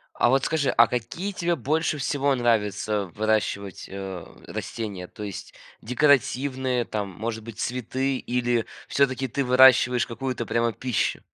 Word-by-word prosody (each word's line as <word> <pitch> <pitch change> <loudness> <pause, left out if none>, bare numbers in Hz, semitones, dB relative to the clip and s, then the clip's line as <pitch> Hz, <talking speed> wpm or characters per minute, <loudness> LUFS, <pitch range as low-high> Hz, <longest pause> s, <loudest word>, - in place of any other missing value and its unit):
А 120 - +3
вот 135 +1 +3
скажи, 155 -4 +1
а 115 - +6
какие 125 - -3
тебе 175 -2 0
больше 155 +1 0
всего 140 0 +1
нравится 105 -4 0
выращивать, 105 -3 -1
а, 95 -3 -6 0.2
растения? 100 -6 -5
То 105 - -10
есть 100 -2 -7 0.3
декоративные 130 -1 +2
там, 105 -2 -3
может 110 +4 -5
быть, 115 -1 -10
цветы 130 +2 -1
или 120 -2 0 0.2
всё-таки 135 -1 +1
ты 140 +2 -1
выращиваешь 125 -1 +6
какую-то 125 0 -4
прямо 115 0 0
пищу? 125 -4 -1
120 Hz, 140 wpm, -25 LUFS, 110-135 Hz, 0.3 s, а